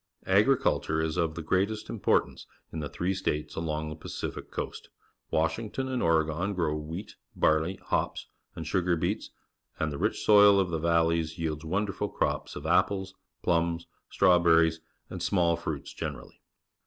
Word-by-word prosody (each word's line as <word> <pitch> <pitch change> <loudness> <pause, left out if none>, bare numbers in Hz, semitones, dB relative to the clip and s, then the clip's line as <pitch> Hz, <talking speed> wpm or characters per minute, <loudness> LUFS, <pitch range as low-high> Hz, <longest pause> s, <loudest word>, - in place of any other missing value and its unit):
Agriculture 80 +1 +3
is 80 -1 -1
of 85 -3 0
the 85 - -5
greatest 100 +6 0
importance 110 - 0 0.3
in 80 - -3
the 75 -2 -4
three 90 +2 -1
states 75 -5 -2
along 80 -1 -2
the 75 - -5
Pacific 75 - -6
Coast. - - -6 0.4
Washington 105 +11 -1
and 130 -1 -1
Oregon 85 +4 +1
grow 80 -4 0
wheat, 80 +6 -6 0.2
barley, 80 +4 +2
hops, - - -2 0.3
and 80 - -6
sugar 90 +1 +1
beets, 80 - -2 0.5
and 80 -1 0
the 70 - -5
rich - - -1
soil 105 -1 +7
of 95 -3 0
the 80 - -1
valleys 85 0 +1
yields 80 -1 -3
wonderful 95 +4 -1
crops - - -2
of - - -7
apples, 95 -1 +1 0.3
plums, 85 0 +1 0.2
st - - -4 0.2
rn.wberr 80 -1 +6
ieSj 80 0 -9 0.3
and - - -6
small 85 -3 +2
fruits 80 -3 -5
gener - - -4
ally. - - -18
85 Hz, 160 wpm, -28 LUFS, 80-95 Hz, 0.5 s, soil